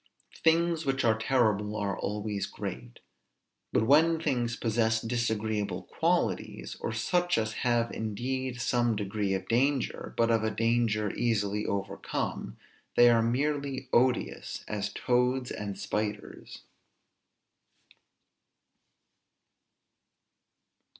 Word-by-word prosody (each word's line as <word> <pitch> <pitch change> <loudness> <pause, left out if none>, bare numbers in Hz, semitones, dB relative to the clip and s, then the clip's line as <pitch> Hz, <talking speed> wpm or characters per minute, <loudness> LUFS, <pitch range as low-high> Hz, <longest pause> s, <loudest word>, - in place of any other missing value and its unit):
Things 165 0 +3
which 135 -3 0
are 110 -1 +4
terrible 110 -3 +1
are 100 -3 -1
always 105 0 -3
great; - - -7 0.7
but 110 - +2
when 160 +5 +5
things 125 -7 0
possess 110 -1 +1
disagreeable 110 -3 -1
qualities, - - -1
or - - -3
such 175 +11 +1
as 110 -1 0
have 120 -2 +1
indeed 125 +4 -3
some 120 -1 +1
degree 100 -1 -1
of 95 0 -5
danger, 130 +2 0
but 115 0 +3
of 110 -1 +2
a 110 - +1
danger 110 -1 +1
easily 105 -3 0
overcome, 100 -1 -3 0.4
they 120 0 +7
are 115 -1 +4
merely 135 +2 -1
odious; 125 0 +1
as 105 0 -3
toads 125 +2 +1
and 100 -2 -5
spiders. 105 -1 -4
115 Hz, 105 wpm, -29 LUFS, 105-125 Hz, 0.7 s, they